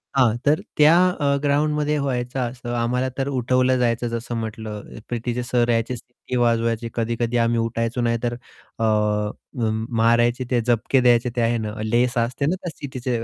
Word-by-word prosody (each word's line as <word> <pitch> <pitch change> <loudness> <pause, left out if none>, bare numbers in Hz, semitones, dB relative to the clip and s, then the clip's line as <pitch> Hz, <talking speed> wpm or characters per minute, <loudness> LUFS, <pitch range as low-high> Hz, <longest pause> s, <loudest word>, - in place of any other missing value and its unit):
हां, 120 -4 +4
तर 150 +2 +4 0.2
त्या 150 +2 +7 0.2
अ, 140 -5 0
ग्राउंडमध्ये 150 +1 +1
व्हायचं 125 -1 -2
असं, 120 -1 -7
आम्हाला 125 +2 0
तर 135 0 -1
उठवलं 130 -1 +2
जायचं 120 0 +1
जसं 115 +1 -4
म्हटलं 110 -1 -6
पीटीचे 120 +1 -2
सर 120 -1 +1
यायचे 115 +2 +1
सिटी 125 +1 -8
वाजवायची 115 -1 +1
कधी-कधी 115 +1 -1
आम्ही 115 0 +2
उठायचो 115 +1 -1
नाही 115 0 +1
तर 120 0 0 0.5
अ, - - 0 0.7
म 110 -3 -1
मारायचे 120 +2 +3
ते 120 -2 +3
झपके 120 +3 +2
द्यायचे 120 0 +4
ते 120 - +1
आहे 115 +1 +2
ना, 105 -1 -4
लेस 120 +3 +1
असते 125 +4 0
ना 175 +5 +1
त्या 180 -2 -6
शिट्टीची 130 -3 -3
120 Hz, 170 wpm, -22 LUFS, 115-130 Hz, 0.7 s, त्या